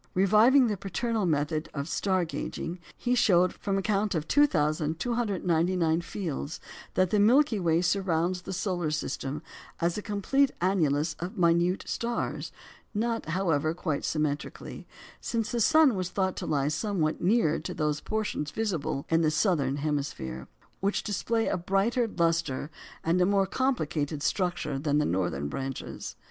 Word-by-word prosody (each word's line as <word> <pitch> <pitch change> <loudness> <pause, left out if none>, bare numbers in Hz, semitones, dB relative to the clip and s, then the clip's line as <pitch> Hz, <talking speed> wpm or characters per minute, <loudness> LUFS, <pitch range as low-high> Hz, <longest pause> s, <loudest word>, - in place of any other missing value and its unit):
Reviving 215 +8 +5
the 210 -3 -1
paternal 215 +2 -1
method 155 0 0
of 140 0 -3
"star 185 +2 0
gauging," 170 +2 -5 0.2
he 245 - 0
showed, 185 -7 +4
from 195 -1 -2
a 195 - -1
count 205 -1 0
of 155 -1 -2
2,299 175 - +1
fields, 165 -5 -4 0.4
that 185 -1 +2
the 210 - +3
Milky 235 +2 +4
Way 170 -1 +2
surrounds 180 -1 +1
the 185 - -7
solar 180 -3 -1
system 150 -2 -3 0.4
as 170 +4 0
a - - -5
complete 245 +7 +1
annulus 160 -4 +1
of 175 +3 -5
minute 170 +1 +2
stars; 235 0 -3 0.4
not, 230 +2 -1
however, 160 -3 0
quite 155 -5 -2
symmetrically, 150 -2 -3 0.3
since 225 -2 -2
the 235 - 0
sun 315 +1 +5
was 185 -3 -2
thought 190 0 -1
to - - -4
lie 145 -2 +1
somewhat 160 -2 -1
nearer 180 -4 +3
to - - -5
those 150 -1 -1
portions 210 -9 -2
visible 170 -10 -2
in 165 0 +2
the 155 - +3
southern 155 -5 +1
hemisphere, 140 - -3 0.3
which 200 +2 0
display 225 +2 0
a - - 0
brighter 195 +7 +1
lustre 165 -6 0 0.3
and 170 +3 +2
a - - +5
more 200 -1 +3
complicated 155 - -1
structure 175 -7 -1
than 145 0 +1
the 150 - +2
northern 85 -6 -1
branches. 135 - -5
175 Hz, 150 wpm, -28 LUFS, 155-205 Hz, 0.4 s, Reviving